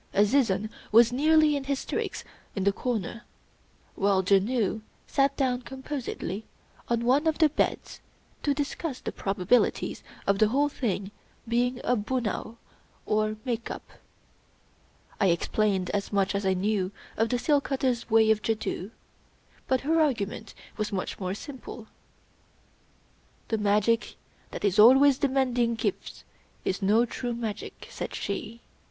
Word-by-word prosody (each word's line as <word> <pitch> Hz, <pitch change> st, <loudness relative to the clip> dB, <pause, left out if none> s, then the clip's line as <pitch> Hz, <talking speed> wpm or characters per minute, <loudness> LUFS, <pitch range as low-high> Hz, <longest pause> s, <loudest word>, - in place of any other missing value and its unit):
Azizun 210 Hz, -1 st, +2 dB, 0.2 s
was 230 Hz, +2 st, +7 dB
nearly 310 Hz, +2 st, +4 dB
in 275 Hz, -1 st, -3 dB
hysterics 275 Hz, -1 st, -3 dB, 0.3 s
in 195 Hz, -, -1 dB
the 200 Hz, -, +4 dB
corner; 230 Hz, -1 st, -3 dB, 0.7 s
while 195 Hz, -1 st, +2 dB
Janoo 205 Hz, +3 st, +2 dB, 0.2 s
sat 275 Hz, 0 st, +1 dB
down 255 Hz, -2 st, +1 dB
composedly 260 Hz, -, -5 dB, 0.5 s
on 235 Hz, 0 st, 0 dB
one 280 Hz, +6 st, +3 dB
of 315 Hz, -, +2 dB
the 315 Hz, -2 st, +5 dB
beds 295 Hz, -, -2 dB, 0.4 s
to 285 Hz, -1 st, +1 dB
discuss 290 Hz, -1 st, -3 dB
the -, -, -5 dB
probabilities 195 Hz, +4 st, +1 dB, 0.2 s
of 200 Hz, 0 st, +2 dB
the 215 Hz, -, +5 dB
whole 280 Hz, +6 st, +2 dB
thing 205 Hz, -7 st, -2 dB, 0.4 s
being 245 Hz, +2 st, +1 dB
a 250 Hz, -, +2 dB
bunao, 230 Hz, 0 st, -2 dB, 0.5 s
or 215 Hz, 0 st, 0 dB
" -, -, -32 dB
make 235 Hz, -2 st, -2 dB
up." -, -, -8 dB, 1.3 s
I 195 Hz, -, +4 dB
explained 190 Hz, +2 st, +1 dB
as 200 Hz, -1 st, -2 dB
much 200 Hz, -1 st, +1 dB
as 200 Hz, -1 st, -1 dB
I 190 Hz, -, +3 dB
knew 195 Hz, 0 st, 0 dB, 0.2 s
of 225 Hz, +1 st, +1 dB
the 245 Hz, -, +1 dB
seal 290 Hz, +3 st, +2 dB
cutter's 260 Hz, -4 st, -1 dB
way 220 Hz, -1 st, +5 dB
of 215 Hz, -1 st, +2 dB
jadoo; 215 Hz, -4 st, -2 dB, 0.8 s
but 260 Hz, -1 st, +2 dB
her 320 Hz, +3 st, +2 dB
argument 225 Hz, -6 st, -1 dB, 0.2 s
was 215 Hz, -1 st, -2 dB
much 190 Hz, -2 st, -3 dB
more 185 Hz, -1 st, -2 dB
simple: 255 Hz, -2 st, -9 dB, 0.8 s
— -, -, -36 dB
*'The 220 Hz, -, 0 dB
magic 210 Hz, +2 st, +2 dB, 0.3 s
that -, -, -4 dB
is 200 Hz, 0 st, +2 dB
always 265 Hz, +4 st, +7 dB
demanding 255 Hz, -4 st, +1 dB
gifts -, -, -4 dB, 0.4 s
is 190 Hz, -, -1 dB
no 215 Hz, +5 st, +4 dB
true 240 Hz, 0 st, -4 dB
magic," 225 Hz, -3 st, -6 dB
said -, -, -5 dB
she. 215 Hz, +3 st, -4 dB
230 Hz, 140 wpm, -27 LUFS, 205-260 Hz, 1.3 s, was